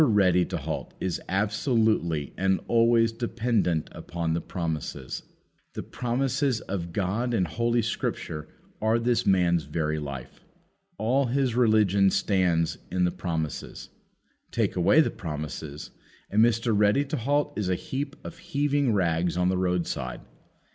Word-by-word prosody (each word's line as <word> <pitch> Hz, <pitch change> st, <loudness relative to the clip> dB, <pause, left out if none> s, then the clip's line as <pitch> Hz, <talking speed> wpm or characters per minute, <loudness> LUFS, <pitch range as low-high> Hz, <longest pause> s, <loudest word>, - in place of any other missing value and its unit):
Ready 95 Hz, -, +4 dB
to -, -, -3 dB
halt -, -, -5 dB
is 95 Hz, -2 st, -2 dB
absolutely 105 Hz, -, +1 dB
and 95 Hz, 0 st, +1 dB
always 115 Hz, 0 st, +4 dB
dependent 115 Hz, -8 st, 0 dB
upon 85 Hz, -1 st, -3 dB
the 85 Hz, -, -1 dB
promises. 80 Hz, -6 st, -4 dB, 0.5 s
The -, -, -5 dB
promises 130 Hz, +1 st, 0 dB
of 85 Hz, -3 st, -4 dB
God 105 Hz, +7 st, -1 dB
in 95 Hz, -5 st, +2 dB
Holy 115 Hz, +7 st, 0 dB
Scripture 80 Hz, -7 st, -3 dB, 0.3 s
are 110 Hz, +1 st, +3 dB
this 120 Hz, 0 st, +1 dB
man's 85 Hz, -4 st, +3 dB
very 75 Hz, +1 st, -1 dB
life. 70 Hz, -4 st, -7 dB, 0.5 s
All 125 Hz, +6 st, +2 dB
his 130 Hz, 0 st, +1 dB
religion 105 Hz, -5 st, +4 dB
stands 90 Hz, -5 st, +1 dB
in 90 Hz, 0 st, 0 dB
the 90 Hz, -, +2 dB
promises. 80 Hz, -5 st, -4 dB, 0.6 s
Take -, -, 0 dB
away 90 Hz, -, +5 dB
the -, -, +1 dB
promises, 75 Hz, -2 st, -6 dB, 0.4 s
and 110 Hz, +2 st, +5 dB
Mr. 115 Hz, -1 st, +2 dB
Ready 105 Hz, +7 st, +3 dB
to 150 Hz, +2 st, -3 dB
halt 145 Hz, +4 st, 0 dB
is 100 Hz, -3 st, -1 dB
a 90 Hz, -, +2 dB
heap 140 Hz, +8 st, -4 dB
of 170 Hz, 0 st, -9 dB
heaving 145 Hz, -6 st, +1 dB
rags 85 Hz, -2 st, +1 dB
on 90 Hz, 0 st, +2 dB
the 95 Hz, -, +1 dB
roadside. 90 Hz, -8 st, -1 dB
100 Hz, 140 wpm, -27 LUFS, 85-120 Hz, 0.6 s, away